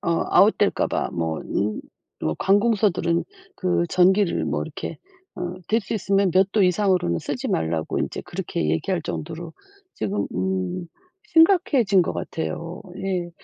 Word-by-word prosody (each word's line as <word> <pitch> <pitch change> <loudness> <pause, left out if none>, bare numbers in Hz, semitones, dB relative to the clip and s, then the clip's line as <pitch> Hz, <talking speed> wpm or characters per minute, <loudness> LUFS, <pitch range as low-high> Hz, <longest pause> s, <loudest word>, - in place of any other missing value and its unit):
어 170 0 0
아웃될까봐 - - +3
뭐 80 -1 -2
음 105 +1 -2 0.4
뭐 80 0 0
관공서들은 195 -5 +2 0.4
그 180 -1 +2
전기를 190 +1 +3
뭐 - - -1
이렇게 - - -6 0.4
음 180 +1 -5
될 225 +2 +3
수 - - -6
있으면 195 -2 +2
몇 190 +2 +4
도 210 - +3
이상으로는 180 - +2
쓰지 - - -4
말라고 80 0 -1
이제 - - -3
그렇게 75 -1 -3
얘기할 170 - -1
정도로 165 +2 -5 0.4
지금 205 +1 -2
음 95 - -2 0.4
심각해진 325 - +4
것 - - -2
같아요. 165 +2 -4 0.2
예. 185 -3 -2
180 Hz, 280 characters per minute, -23 LUFS, 150-200 Hz, 0.4 s, 몇